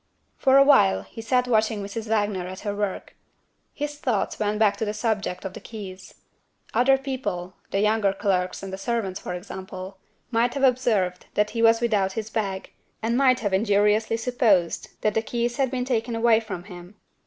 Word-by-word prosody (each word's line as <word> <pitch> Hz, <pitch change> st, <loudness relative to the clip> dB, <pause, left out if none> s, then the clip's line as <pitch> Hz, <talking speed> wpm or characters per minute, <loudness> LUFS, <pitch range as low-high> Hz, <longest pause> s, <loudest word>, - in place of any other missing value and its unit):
For 265 Hz, 0 st, +4 dB
awhile 100 Hz, -, +5 dB
he 225 Hz, -, -10 dB
sat 250 Hz, +2 st, +1 dB
watching 220 Hz, -3 st, +1 dB
Mrs. 215 Hz, +3 st, -5 dB
Wagner 205 Hz, -4 st, 0 dB
at 185 Hz, +1 st, -8 dB
her 205 Hz, -2 st, -3 dB
work. 205 Hz, -2 st, -3 dB, 0.6 s
His 290 Hz, 0 st, -5 dB
thoughts 240 Hz, -9 st, -1 dB
went 210 Hz, 0 st, 0 dB
back 210 Hz, -2 st, +3 dB
to 220 Hz, -, -1 dB
the 210 Hz, 0 st, -3 dB
subject 210 Hz, -4 st, -2 dB
of 190 Hz, -, -4 dB
the -, -, -8 dB
keys. 195 Hz, -4 st, -9 dB, 0.6 s
Other 270 Hz, +2 st, +4 dB
people 205 Hz, -10 st, -4 dB, 0.2 s
the 195 Hz, -, 0 dB
younger 210 Hz, -1 st, +2 dB
clerks 190 Hz, -1 st, -1 dB
and 195 Hz, -1 st, -6 dB
the 190 Hz, -, -5 dB
servants, 195 Hz, -3 st, -2 dB
for 180 Hz, -, -5 dB
example 190 Hz, +1 st, -8 dB, 0.3 s
might 240 Hz, +2 st, +1 dB
have 275 Hz, -, -2 dB
observed 225 Hz, -9 st, +1 dB
that 210 Hz, 0 st, +2 dB
he 230 Hz, -, -2 dB
was 225 Hz, 0 st, +5 dB
without 205 Hz, -5 st, +1 dB
his 220 Hz, +1 st, -5 dB
bag, 195 Hz, -4 st, -3 dB, 0.3 s
and 230 Hz, +1 st, +1 dB
might 255 Hz, -1 st, +4 dB
have 205 Hz, -3 st, -1 dB
injuriously 210 Hz, +2 st, +2 dB
supposed 225 Hz, -8 st, +1 dB
that 215 Hz, -, +1 dB
the 220 Hz, -, +1 dB
keys 240 Hz, +2 st, -2 dB
had 270 Hz, -2 st, +2 dB
been 250 Hz, -1 st, -2 dB
taken 235 Hz, -2 st, -1 dB
away 230 Hz, -1 st, +4 dB
from 205 Hz, -6 st, -6 dB
him. 180 Hz, 0 st, -11 dB
215 Hz, 185 wpm, -25 LUFS, 195-235 Hz, 0.6 s, awhile